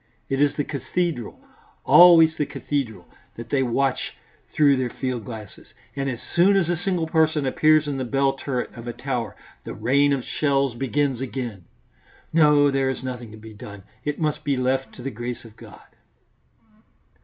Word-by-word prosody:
It 135 +1 0
is 145 -1 +3
the 145 - -1
cathedral, 150 -2 -3 0.5
always 165 -2 +7
the 150 - -1
cathedral, 115 -11 -4 0.3
that 115 0 -9
they 140 - +2
watch 130 +1 -1 0.4
through 145 -2 +4
their 130 -1 -1
field 125 -3 -4
glasses, 110 -3 -10 0.3
and 135 -1 -2
as 120 -3 -4 0.2
soon 190 +4 +5
as 190 -4 +2
a 175 - +2
single 175 -1 -1
person 160 -2 +1
appears 155 +3 +3
in 140 -2 -2
the - - -1
bell 135 +2 +1
turret 135 -2 -4
of 120 0 -10
a 120 - -4
tower 125 -1 -4 0.3
the - - -7
rain 140 +6 +2
of 135 -3 -1
shells 140 -3 0
begins 135 +1 -1
again. 120 -8 -5 0.7
No, 150 -3 +5
there 135 -1 +1
is 130 - -4
nothing 125 -3 -6
to 110 - -12
be 110 0 -12
done. 105 -1 -11 0.2
It 150 0 -2
must 155 -1 -1
be 140 -3 0
left 130 +1 -1
to 125 - -11
the 135 - -3
grace 120 +1 -6
of 110 -1 -14
God." - - -14
135 Hz, 180 wpm, -23 LUFS, 120-150 Hz, 0.7 s, always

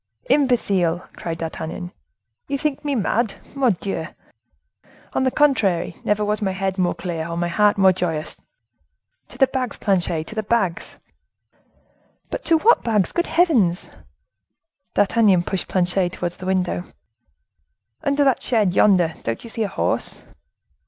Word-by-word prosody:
"Imbecile!" 195 - +2
cried 165 -1 -5
D'Artagnan, 165 +2 -5 0.6
"you 280 - -1
think 290 0 -2
me 290 -2 -1
mad! 225 -1 0 0.2
Mordioux! 200 - 0 1.1
On - - +1
the - - +4
contrary, 215 - +2
never 210 0 +1
was 210 +1 -1
my 190 -2 0
head 190 0 -2
more 180 -1 +1
clear, 165 -3 -4
or 170 0 -4
my 175 0 0
heart 205 +4 +3
more 190 -1 +5
joyous. 165 -4 -3 0.9
To - - -13
the 270 - +6
bags, 260 -1 -3
Planchet, 175 -5 0
to 220 - -8
the 220 - -1
bags!" 205 -5 -1 1.3
"But - - -4
to 330 - +5
what 445 +9 +4
bags, 215 -5 +1
good 345 +1 -1
heavens!" 245 - +2 1.1
D'Artagnan 205 -4 +4
pushed 190 +1 -3
Planchet 180 0 +1
towards 175 -1 -4
the 185 - -7
window. 185 -1 0 1.2
"Under 285 0 +2
that 270 -3 +2
shed 215 -7 +1
yonder, 180 -5 +4
don't 115 0 -4
you 230 - -8
see 225 - -4
a 215 - +1
horse?" 195 - -2
195 Hz, 145 wpm, -22 LUFS, 175-235 Hz, 1.3 s, the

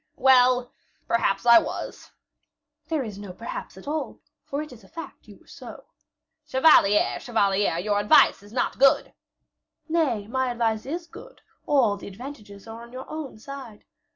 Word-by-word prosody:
"Well, 255 -1 +4 0.4
perhaps 230 -1 0
I 235 -1 +8
was." - - -6 0.8
"There 310 -3 -1
is 210 -4 -8
no 200 -3 -8
perhaps 230 -1 -7
at 190 - -13
all, 305 +1 -4 0.2
for 285 +2 -4
it 305 - -11
is 230 -3 -16
a - - -17
fact 330 - -10
you - - -14
were - - -26
so." - - -11 0.6
"Chevalier, 260 -8 +4
chevalier, 200 -6 +1
your 205 +3 0
advice 205 -1 +5
is 205 +1 -16
not 245 +2 -2
good." 275 0 +4 0.7
"Nay, 300 -11 0
my 260 +3 -1
advice 230 -1 -1
is 335 +4 -4
good; - - -14 0.3
all 240 -8 +3
the - - -10
advantages 205 -2 -10
are 225 +1 -9
on 235 0 -13
your 255 +1 -8
own 310 -7 -6
side. 250 -2 -10
240 Hz, 160 wpm, -25 LUFS, 210-275 Hz, 0.8 s, I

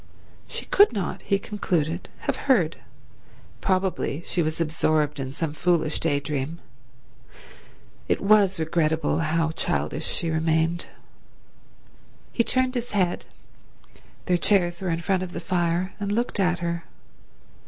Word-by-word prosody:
She - - -4
could 410 +1 +6
not, 200 -5 -3
he 195 - +1
concluded, 175 -5 -2
have - - -1
heard. 175 -11 +4 0.8
Probably 185 -5 0
she 175 - 0
was 160 0 -1
absorbed 155 -2 +1
in 135 -1 -3
some 150 +1 -3
foolish 165 -1 +1
day 145 -3 +1
dream. 145 +2 -3 1.5
It - - +1
was 195 -3 +4
regrettable 160 -1 +1
how 160 0 +1
childish 160 -1 -2
she 165 -2 -2
remained. 160 +2 +1 1.4
He 235 - +2
turned 255 +1 +1
his 245 -1 -3
head—their 180 -1 -4
chairs 175 -1 +2
were 190 - -1
in 165 0 -1
front 185 +1 +1
of 185 -1 -5
the - - -3
fire—and 180 +3 -1
looked 235 0 0
at 180 -2 +3
her. 170 0 -2
170 Hz, 125 wpm, -25 LUFS, 160-190 Hz, 1.5 s, could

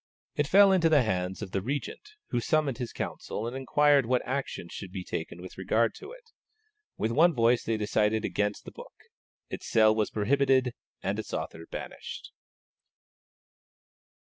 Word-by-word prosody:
It 145 - 0
fell 200 +4 +7
into 175 -4 +4
the 150 -4 +5
hands 95 -1 -2
of 95 - -7
the 95 - -1
Regent, 145 - -5 0.2
who 120 - 0
summoned 140 0 0
his 120 -2 -4
council 110 - -5
and 120 - -5
inquired 140 0 +3
what 125 0 +1
action 130 -8 -3
should 95 +1 -8
be 95 -1 -5
taken 85 +1 -5
with 95 - -10
regard 115 +4 +1
to 400 - -10
it. - - -15 0.7
With 110 - -1
one 165 +6 +4
voice 115 0 +3
they 115 -1 -1
decided 105 +1 +1
against 105 0 -1
the - - -8
book; - - -12 0.6
its - - -6
sale 110 -1 +5
was 110 -1 0
prohibited, 130 +3 +2 0.3
and - - -1
its - - -4
author 80 0 -6
banished. - - -7
120 Hz, 165 wpm, -28 LUFS, 105-140 Hz, 0.7 s, fell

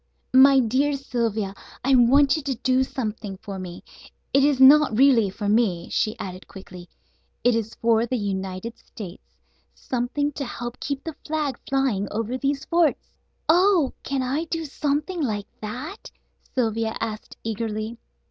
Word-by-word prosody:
"My 270 +1 +8
dear 260 +5 +2
Sylvia, 230 -7 -2 0.3
I 270 +2 +3
want 270 +4 +5
you 310 - -2
to 275 -2 -2
do 255 +2 +2
something 215 -7 -4
for 195 0 -7
me; 180 -2 -8 0.5
it 275 0 +5
is 285 -2 +3
not 270 -3 +7
really 250 -6 +5
for 205 +2 -5
me," 205 -5 +1
she 215 -1 0
added 185 0 -7
quickly, 180 -2 -11 0.5
"it 245 - +4
is 225 -1 -2
for 230 0 +2
the 255 - -1
United 195 +1 -4
States. 195 -5 -11 0.4
Something 265 +4 -2
to 285 - -5
help 240 -1 -6
keep 280 -1 -4
the 325 -3 -6
flag 300 -5 -2
flying 265 -8 +1
over 225 +3 -2
these 275 +1 -1
forts." 335 -2 +1 0.4
"Oh, 350 -3 +4
can 270 -1 -2
I 280 +6 -1
do 325 0 -3
something 300 +5 -2
like 210 -7 -1 0.2
that?" 255 - -6 0.5
Sylvia 225 -2 0
asked 220 -1 -5
eagerly. 225 +1 -3
245 Hz, 150 wpm, -24 LUFS, 215-280 Hz, 0.5 s, My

